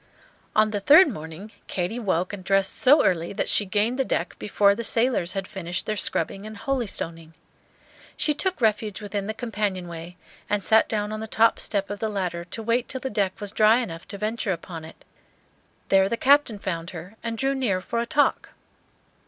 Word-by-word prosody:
On 215 0 +4
the 205 - -1
third 300 - +7
morning 165 - -8 0.2
Katy 185 +6 -2
woke 185 -4 -1
and 195 -2 -6
dressed 195 +1 +1
so 290 +4 +5
early, 170 -1 0
that 200 - -2
she 205 - +3
gained 215 +7 0
the - - +4
deck 175 -8 -2
before 200 -1 +3
the 235 - -4
sailors 230 -7 +1
had 195 -1 -3
finished 175 -2 -4
their 215 - -1
scrubbing 195 -1 -1
and 215 0 -9
holystoning. 170 -11 -3 0.8
She 300 - +2
took 370 +3 -1
refuge 215 -3 0
within 205 -1 -4
the 220 - -3
companion 210 -5 -3
way, 170 +1 -9 0.3
and 205 -1 0
sat 220 +6 +4
down 210 -1 -1
on 215 - -4
the 220 - -5
top 225 +1 +3
step 200 -1 -1
of 205 - -5
the 220 - -1
ladder, 180 -4 -3
to 225 +5 -6
wait 235 +2 0
till 260 - -2
the 265 - -4
deck 200 -2 -1
was 205 -2 -4
dry 215 +1 +5
enough 170 -10 -5
to 200 - -7
venture 215 0 -2
upon 165 -2 -6
it. 160 - -15 0.8
There 195 0 +4
the 235 - -1
Captain 275 -4 +4
found 170 -4 -4
her 180 +3 -9
and 230 -1 -4
drew 270 +3 +1
near 240 -9 0
for 230 +5 -3
a 235 - -2
talk. 295 -2 +1
205 Hz, 200 wpm, -25 LUFS, 185-230 Hz, 0.8 s, third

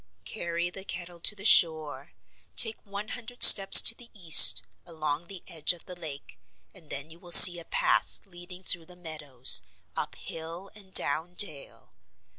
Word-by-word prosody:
"Carry 170 - -7
the 190 +1 -10
kettle 175 -2 -10
to 210 - +2
the 205 0 -10
shore. 160 -7 0 0.4
Take 225 -1 0
one 200 +2 -10
hundred 245 0 -7
steps 195 -1 +7
to - - 0
the 235 0 -18
east, 170 -6 +4 0.2
along 155 -1 -8
the 190 -2 -13
edge 165 -2 -2
of 175 - -15
the 180 - -12
lake, 155 -5 -12 0.3
and 170 -6 -18
then 145 +3 -10
you 165 - -18
will 175 -1 -16
see 175 0 +9
a 165 - -13
path - - -4
leading 180 0 -14
through 170 -3 -6
the 180 - -15
meadows, 150 -7 0 0.3
up - - -8
hill 165 +4 -11
and 200 -3 -16
down 165 +2 -2
dale. 155 -9 -5
175 Hz, 170 wpm, -24 LUFS, 160-195 Hz, 0.4 s, see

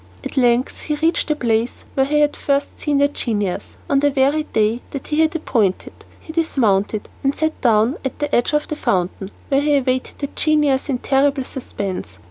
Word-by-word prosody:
At - - -6
length 245 -1 +2
he 300 - -2
reached 325 +3 +1
the 305 - +1
place 235 -3 -1
where 270 0 +2
he 300 +1 +2
had 295 0 +2
first 280 0 -1
seen 295 -2 0
the 285 0 +4
genius, 210 -9 -3
on 275 - +3
the 290 +1 +3
very 280 +2 +2
day 220 0 0
that 280 - -6
he 300 0 0
had 320 +1 +3
appointed. 220 - 0 0.3
He 315 - -10
dismounted, 215 - +1 0.2
and 275 +1 +1
sat 315 0 -2
down 230 +2 +3
at 265 - -4
the 295 -1 -3
edge 240 +5 +1
of 300 0 +1
the 305 - -3
fountain, 190 -5 -1 0.2
where 275 0 +3
he 295 0 +2
awaited 255 -1 -1
the 280 - -3
genius 300 -3 +2
in 265 - +1
terrible 275 +1 +1
suspense. 195 - -5
275 Hz, 195 wpm, -20 LUFS, 235-295 Hz, 0.3 s, the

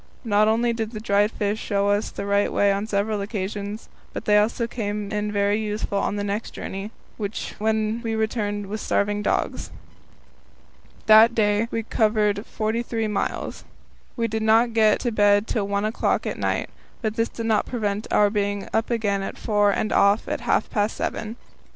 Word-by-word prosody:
Not 210 -1 +3
only 235 +2 +2
did 225 0 -4
the 215 - -5
dried 205 -1 +2
fish 210 -1 -2
show 200 -2 0
us 205 +1 +1
the 200 - -6
right 200 0 +1
way 200 0 +3
on 200 +2 -1
several 205 0 0
occasions, 205 +1 -4 0.3
but - - -6
they 210 - +4
also 230 +3 +1
came 210 -3 -4
in 210 0 -1
very 205 +1 +1
useful 210 -2 -2
on 200 - -1
the 205 - -2
next 205 +2 -3
journey, 195 +2 -5 0.7
when 220 +1 0
we 225 -1 -2
returned 210 -2 -1
with 210 +2 -5
starving 205 0 0
dogs. - - -1 1.4
That 220 +2 +7
day 210 0 +2
we 225 -1 -2
covered 215 -1 +1
forty 220 +2 -1
three 225 -2 -2
miles. 210 - -3 0.5
We 230 -1 +1
did 220 0 -3
not 225 +2 +4
get 220 -2 +4
to 240 - -1
bed 205 -1 +4
till 215 -3 -1
one 200 +1 0
o'clock 215 - 0
at - - -3
night, - - -1 0.3
but 215 -1 -1
this 230 0 0
did 230 - -6
not 220 -2 +1
prevent 210 -3 -2
our 205 -1 +3
being 205 -1 -1
up 225 0 +1
again 210 -4 0
at 195 - -5
four 205 -2 +2
and 215 +2 0
off 200 +2 +3
at - - -3
half - - +1
past 210 -1 0
seven. 220 +1 -3
210 Hz, 180 wpm, -24 LUFS, 205-220 Hz, 1.4 s, That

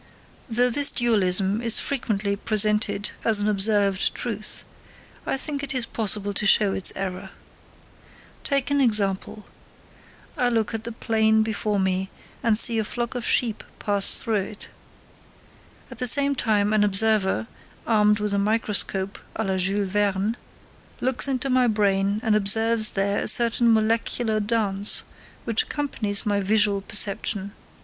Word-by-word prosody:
Though 245 +2 +1
this 285 +3 +5
dualism 200 -3 +1
is 230 -1 +2
frequently 210 -7 -2
presented 210 0 0
as 220 -2 +3
an 205 - 0
observed 200 -1 +2
truth, 215 -3 -1 0.6
I - - -1
think 285 +1 -3
it 275 -1 -3
is 250 -2 +1
possible 205 -3 -2
to 205 - -1
show 205 -2 +4
its 190 - -1
error. 185 -1 -5 1.1
Take 275 -1 -1
an 285 0 +2
example: 210 -3 -1 0.9
I 245 - +2
look 225 -2 -1
at 225 0 -5
the 235 - -5
plain 220 -1 +1
before 215 -1 -2
me, 190 0 -1 0.3
and 225 -2 +2
see 230 0 +4
a - - 0
flock 235 +2 -5
of 245 -2 -5
sheep 230 -4 +1
pass 200 -1 +1
through 225 -3 -1
it. 210 +2 -8 1.2
At - - -11
the 250 - +2
same 280 +3 +4
time 215 -5 0
an 215 -1 +3
observer, 200 - +1 0.4
armed 210 -2 +2
with 210 -1 -2
a 200 - +1
microscope 200 -2 -1 0.2
à 220 - -3
la 190 -1 -1
Jules 195 +1 -1
Verne, 205 +1 0 0.6
looks 260 +2 +1
into 270 0 -2
my 255 -1 +2
brain 200 -2 0
and 220 -3 +1
observes 220 +2 +2
there 200 +1 -1
a - - -3
certain 235 0 +4
molecular 225 0 0
dance 205 -2 +1 0.4
which 230 -2 +1
accompanies 235 -8 -3
my 205 -1 0
visual 205 0 +1
perception. 200 -1 -1
215 Hz, 145 wpm, -23 LUFS, 200-230 Hz, 1.2 s, this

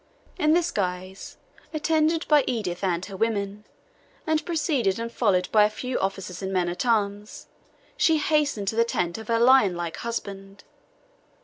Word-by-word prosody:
In 305 -2 +3
this 345 0 +2
guise, 185 -1 -4 0.4
attended 315 +1 +1
by 300 -2 +5
Edith 205 -7 -3
and 180 -1 0
her 195 - -9
women, 205 -1 -2 0.6
and 315 0 +1
preceded 300 - 0
and 230 0 -4
followed 190 -7 +1
by 215 -1 +6
a 210 - +3
few 250 +4 -4
officers 190 -2 -4
and 190 0 -3
men 180 -2 0
at 180 +8 -3
arms, 205 -2 -1 0.5
she 320 -2 +3
hastened 295 -9 0
to 220 - -4
the 230 - +4
tent 180 -5 -2
of 220 - -10
her 230 0 +1
lionlike 200 -10 +3
husband. 200 -4 -6
210 Hz, 155 wpm, -25 LUFS, 190-265 Hz, 0.6 s, by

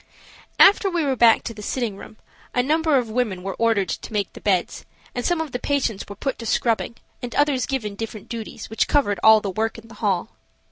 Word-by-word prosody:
After 400 0 +6
we 345 -3 0
were 275 -2 +1
back 230 -2 +5
to 230 - -5
the 210 - -10
sitting 230 -1 -2
room 215 - -12 0.4
a 250 - +3
number 310 +1 +2
of 245 -3 0
women 215 -6 -1
were 195 0 -3
ordered 225 -4 +2
to 220 - -5
make 205 -3 -1
the - - -11
beds, 185 -4 0 0.3
and 245 - -3
some 350 +4 +1
of 320 -3 -3
the 245 - -3
patients 260 -9 -1
were 200 - -7
put 265 +6 -3
to 230 - -6
scrubbing 230 +1 0 0.3
and 245 -1 -6
others 285 -5 +2
given 240 -7 -2
different 215 0 -7
duties 225 -2 -7
which 220 - 0
covered 205 -10 +1
all 220 0 +7
the 200 - -3
work 220 +4 -2
in 225 0 -13
the - - -12
hall. 200 0 0
230 Hz, 225 wpm, -23 LUFS, 210-265 Hz, 0.4 s, all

